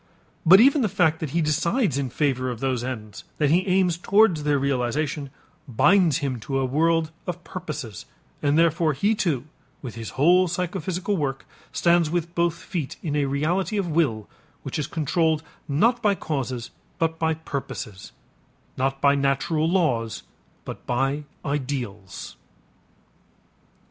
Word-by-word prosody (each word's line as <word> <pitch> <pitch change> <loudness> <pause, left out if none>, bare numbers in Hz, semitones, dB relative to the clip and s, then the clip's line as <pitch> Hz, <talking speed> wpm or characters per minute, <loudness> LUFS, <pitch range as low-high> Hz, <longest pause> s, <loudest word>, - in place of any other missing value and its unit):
But 190 +4 +9
even 275 +4 +5
the 220 - +1
fact 160 -4 +2
that 155 - -3
he 165 +4 0
decides 170 - +1
in 140 -2 -1
favor 130 -1 0
of 120 -3 -5
those 130 -2 -1
ends, 110 -5 -6
that 150 -2 +2
he 180 +4 +3
aims 180 -2 +2
towards 195 -4 +4
their 145 -1 +2
realization, 140 +2 -1 0.4
binds 170 - +4
him 130 -3 -2
to 135 +5 -3
a 135 - +1
world 160 +4 +1 0.2
of 175 0 -4
purposes, 150 - -7 0.3
and 145 +1 +2
therefore, 165 -1 +3
he, 200 +11 +2
too, 160 - 0 0.4
with 125 -4 -6
his 115 0 -8
whole 180 +6 +5
psychophysical 180 +2 -2
work, 140 -5 -2 0.3
stands 170 -2 +3
with 170 0 -2
both 170 -1 +1
feet 170 -4 -5
in 150 -3 -2
a 145 -1 +2
reality 165 +10 0
of 190 -4 -1
will 130 -10 +1 0.4
which - - -4
is 150 - -2
controlled 160 0 0 0.2
not 230 - +2
by 205 -2 +3
causes 130 -8 -4 0.3
but 160 0 -1
by 160 -1 +1
purposes, 135 -9 -6 0.7
not 135 +1 -1
by 140 0 +5
natural 140 +3 +1
laws 130 - 0 0.4
but - - -7
by 135 +4 0 0.2
ideals. 125 - -4
150 Hz, 150 wpm, -24 LUFS, 135-170 Hz, 0.7 s, But